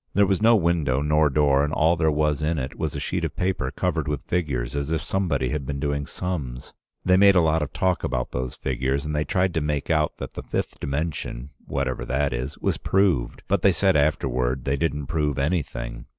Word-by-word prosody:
There 100 +1 +5
was 95 0 0
no 115 +1 +6
window, 80 -8 +1
nor 75 0 +3
door, 70 0 +3
and 75 - -1
all 80 +2 +3
there 80 -1 +2
was 75 -1 +1
in 80 +2 0
it 65 -2 -4
was 80 -2 -3
a - - -2
sheet - - -2
of - - -3
paper 90 -7 -1
covered 80 +1 -1
with 75 -2 -3
figures, 70 -8 -1
as 70 0 -2
if 80 0 -1
somebody 85 -10 0
had 75 -1 -2
been 70 +1 -4
doing 70 0 -2
sums. 70 -9 -5 0.3
They 90 0 +5
made 100 0 +6
a 90 - +6
lot 80 0 +2
of 75 - -3
talk 90 -1 0
about - - -2
those 65 0 -3
figures, 65 +2 -1
and 75 0 -2
they 75 +1 0
tried 95 -1 +1
to 80 - 0
make 75 +1 -1
out 75 -2 +1
that - - -7
the - - -6
fifth - - -4
dimension, 70 -2 -3 0.2
whatever 70 -2 -2
that 70 +1 0
is, 65 +4 -4
was - - -1
proved, 95 -11 +1
but - - +1
they 100 - +5
said 95 +2 +2
afterward 65 -4 +1
they 70 0 +1
didn't 75 -1 -1
prove 75 -1 -1
anything. 70 -5 -2
75 Hz, 220 wpm, -24 LUFS, 70-85 Hz, 0.3 s, no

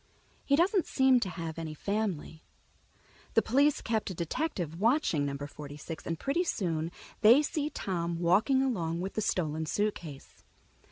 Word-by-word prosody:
He 280 - +3
doesn't 360 +4 +2
seem 265 -2 +4
to 195 - -2
have 165 -2 -5
any 160 -2 -5
family. 195 -5 -3 0.9
The 225 - +5
police 280 +5 +3
kept 220 -2 -1
a 185 - -5
detective 170 - -3
watching 220 - +2
Number 140 0 -4
Forty 145 0 -9
six, 160 +2 -8
and 165 - -2
pretty 300 +6 0
soon 165 - -1 0.3
they 235 +7 +7
see 300 0 -1
Tom 170 - -3
walking 200 +11 +3
along 170 -10 -1
with 190 +2 -4
the 215 - -1
stolen 160 -5 -1
suitcase. 175 -8 -4
185 Hz, 155 wpm, -30 LUFS, 160-260 Hz, 0.9 s, they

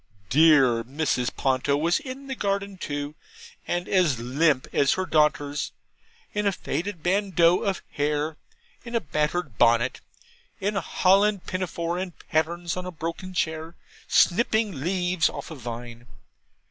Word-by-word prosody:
Dear 135 -5 +5
Mrs. 130 -1 -1
Ponto 135 +1 +1
was 165 +4 +2
in 275 -2 -8
the 270 - -4
garden 200 -3 -2
too, 145 -4 -4 0.5
and 175 +1 -1
as 170 -10 +2
limp 130 +3 +2
as 140 - +3
her 185 - -1
daughters; 150 -3 +1 0.6
in 210 0 0
a - - +3
faded 175 0 -4
bandeau 180 -2 +3
of 195 -3 -2
hair, 150 +1 -1 0.5
in 235 0 -6
a - - +4
battered 150 - -2
bonnet, 120 +1 +3 0.6
in 205 +1 -1
a 195 - +1
holland 195 +1 +3
pinafore, 175 -2 -2
in 185 -2 -4 0.2
pattens, 170 +2 0
on 180 0 -4
a - - -4
broken 170 +3 -6
chair, 160 0 -2 0.3
snipping 215 - +2
leaves 180 0 +1
off - - -8
a - - -6
vine. 120 -1 -8
165 Hz, 140 wpm, -25 LUFS, 145-185 Hz, 0.6 s, Dear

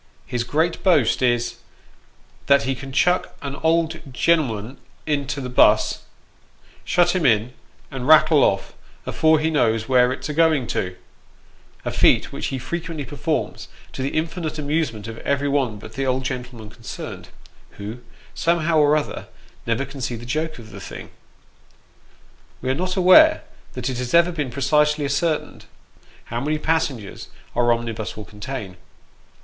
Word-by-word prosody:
His 120 -1 -2
great 160 +7 0
boast 160 - +3
is, 120 -1 +1 0.5
" - - -33
that 140 0 +5
he 135 - 0
can 135 +1 -8
chuck 180 +7 +1
an 140 -1 -4
old 165 0 +1
gen'lm'n 125 -5 0 0.3
into 145 -2 -1
the 130 - -4
buss, 125 - +3 0.8
shut 175 +1 +2
him 180 - 0
in, 115 -1 +2 0.4
and 130 -1 -5
rattle 155 -1 +6
off, 95 - 0 0.3
afore 160 0 +3
he 160 +1 0
knows 115 -7 +1
where 125 -1 +4
it's 130 +1 -5
a 150 - -3
going 160 -4 +3
to 90 -1 -2 0.4
" - - -31
a - - -1
feat - - +3
which - - -3
he 135 - -3
frequently 160 +3 -5
performs, - - -3 0.3
to - - -5
the 135 - 0
infinite 160 -1 -3
amusement 145 -8 -2
of 115 0 -7
every 140 0 0
one 135 -6 0
but 110 +2 -11
the 135 +2 -2
old 130 0 0
gentleman 125 -4 -6
concerned, 110 -2 -8 0.5
who, 105 +4 -6 0.3
somehow 165 -1 +1
or 150 0 +5
other, 150 - -4 0.4
never 115 +4 0
can 135 0 -10
see 120 0 -2
the 115 +1 -9
joke 155 +5 -2
of 110 -3 -12
the 100 0 -10
thing. - - -9 1.5
We 130 - -1
are - - +2
not 185 +5 -2
aware 205 - +6 0.3
that 125 -1 -4
it 130 -2 -3
has 125 +4 -1
ever 170 +1 +5
been 150 -6 -3
precisely 150 +3 +2
ascertained, 150 +3 -1 0.6
how 120 +1 -4
many 155 +3 0
passengers 150 -10 -2 0.3
our 120 0 +3
omnibus 115 -4 -3
will 105 - -7
contain. 105 -3 -7
135 Hz, 160 wpm, -22 LUFS, 120-155 Hz, 1.5 s, rattle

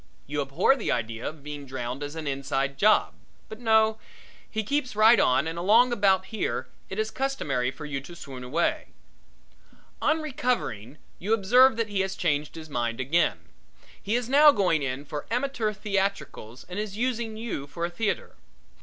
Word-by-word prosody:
You 145 +1 -2
abhor 140 - +3
the 245 - -2
idea 115 -1 -2
of 155 -2 -13
being 145 -1 -7
drowned 130 +1 -5
as 145 +1 -5
an 160 -1 -5
inside 140 0 -1
job. 215 +1 +4 0.4
But 220 - -9
no, 220 -2 +3 0.5
he 220 0 -2
keeps 270 0 -1
right 220 +1 +6
on 140 +1 +3
and 165 +1 -4
along 230 +7 +5
about 195 -4 +3
here 220 - -2 0.2
it 190 - -6
is 220 0 -1
customary 150 - -1
for 145 +4 -8
you 145 -2 -4
to 170 +5 -11
swoon 135 -5 -9
away. 150 +8 -1 1.1
On 315 - +2
recovering, 245 - -2 0.2
you 210 +5 +2
observe 245 +4 +5
that 230 -2 -1
he 200 -1 -2
has 190 0 -1
changed 150 -3 -1
his 160 -1 -8
mind 120 -4 -2
again. 150 +7 +1 0.6
He 210 +3 -1
is 245 -1 -1
now 290 +3 +7
going 185 - +1
in 135 +1 -3
for 145 0 -6
amateur 240 -2 -1
theatricals 195 - -3
and 180 +3 -5
is 210 -1 -4
using 235 -2 -2
you 220 -11 -4
for 170 +3 -3
a 175 - -4
theatre. 210 +4 -2
190 Hz, 175 wpm, -26 LUFS, 140-220 Hz, 1.1 s, now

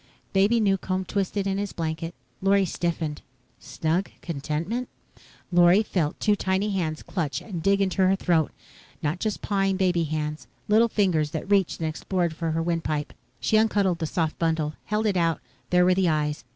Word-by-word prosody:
Baby 200 +4 +4
Newcomb 190 -2 0
twisted 200 +1 -1
in 195 0 0
his 205 -1 -3
blanket. 165 0 -3 0.3
Lorry 195 0 +4
stiffened. 165 -3 -2 0.4
Snug 165 +5 -1
contentment? 165 - -3 0.6
Lorry 175 +4 +6
felt 170 -8 -1
two 210 -1 +3
tiny 195 +1 0
hands 160 -5 -2
clutch 160 -7 -2
and 180 -7 -6
dig 195 +3 +3
into 190 0 +1
her 190 - +4
throat. 170 -5 +1 0.5
Not 155 +4 -1
just 215 +1 -2
pawing 195 -2 +1
baby 180 -3 +2
hands. 150 0 -3 0.2
Little 220 +3 +5
fingers 180 -9 +1
that 160 +3 -5
reached 195 -3 +2
and 160 - -1
explored 170 +2 -1
for 165 0 -2
the 165 +1 0
windpipe. 160 -3 -2 0.3
She 135 - +2
uncuddled 205 -5 +2
the 160 - -1
soft 160 -1 -1
bundle, 160 -2 0
held 210 +1 0
it 200 -3 +2
out. 165 -2 +1 0.3
There 180 0 +4
were 185 - +5
the 185 -1 +2
eyes. 150 -3 -1
180 Hz, 170 wpm, -25 LUFS, 160-195 Hz, 0.6 s, Lorry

